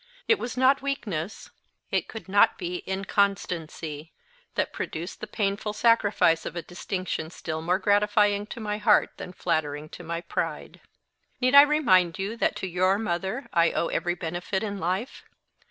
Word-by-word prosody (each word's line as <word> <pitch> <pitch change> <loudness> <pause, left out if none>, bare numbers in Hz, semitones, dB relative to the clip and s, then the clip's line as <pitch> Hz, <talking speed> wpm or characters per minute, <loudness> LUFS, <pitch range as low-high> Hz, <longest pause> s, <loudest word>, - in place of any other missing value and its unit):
It 450 - +4
was 245 +1 -5
not 260 +2 +4
weakness 215 - -4 0.4
it - - 0
could 225 - -9
not 200 +1 +4
be 180 -1 -3
inconstancy 180 -6 -2 0.4
that - - -1
produced 170 +3 -5
the 215 - -5
painful 205 0 -2
sacrifice 205 -8 +3
of - - -6
a 170 - -4
distinction 175 -1 -4
still 160 -2 -5
more 175 +3 +1
gratifying 205 0 +2
to - - -8
my 210 -1 -3
heart 210 - +4
than - - -7
flattering 155 -4 -2
to 175 - -10
my 170 0 -4
pride. - - -4 0.6
"Need 255 +1 +2
I 280 - +12
remind 210 - +3
you 200 +4 -3
that - - +1
to 190 - -4
your 185 +2 +2
mother 205 +5 -3
I 170 -2 +3
owe 170 - 0
every 175 0 -1
benefit 175 +3 -3
in 205 -2 -3
life? 185 +8 -3
190 Hz, 160 wpm, -26 LUFS, 170-210 Hz, 0.6 s, I